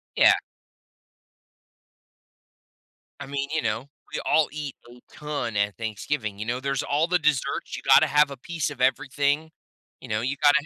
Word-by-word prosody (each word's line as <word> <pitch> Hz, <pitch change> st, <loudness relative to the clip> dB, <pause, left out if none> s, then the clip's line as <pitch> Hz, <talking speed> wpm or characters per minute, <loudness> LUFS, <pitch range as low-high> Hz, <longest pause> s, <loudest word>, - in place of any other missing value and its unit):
Yeah. -, -, +7 dB, 2.9 s
I -, -, -6 dB
mean, 140 Hz, 0 st, -2 dB
you 160 Hz, -, +1 dB
know, 125 Hz, -, -2 dB, 0.3 s
we -, -, -1 dB
all 155 Hz, -1 st, +3 dB
eat 150 Hz, -2 st, -5 dB
a 125 Hz, +1 st, -14 dB
ton 145 Hz, -7 st, -4 dB
at 100 Hz, 0 st, 0 dB
Thanksgiving. 110 Hz, 0 st, -3 dB
You 110 Hz, -, -4 dB
know, 120 Hz, +2 st, -1 dB
there's 140 Hz, 0 st, -1 dB
all 150 Hz, +4 st, +1 dB
the 180 Hz, 0 st, +2 dB
desserts. 150 Hz, -4 st, 0 dB
You -, -, -6 dB
gotta -, -, +6 dB
have 150 Hz, -1 st, +4 dB
a 135 Hz, -, -7 dB
piece 165 Hz, +2 st, -3 dB
of 135 Hz, -3 st, -8 dB
everything. 140 Hz, +4 st, +1 dB, 0.5 s
You -, -, -11 dB
know, 110 Hz, +1 st, 0 dB
you 135 Hz, +4 st, -1 dB
gotta 145 Hz, 0 st, +5 dB
140 Hz, 165 wpm, -25 LUFS, 120-150 Hz, 2.9 s, Yeah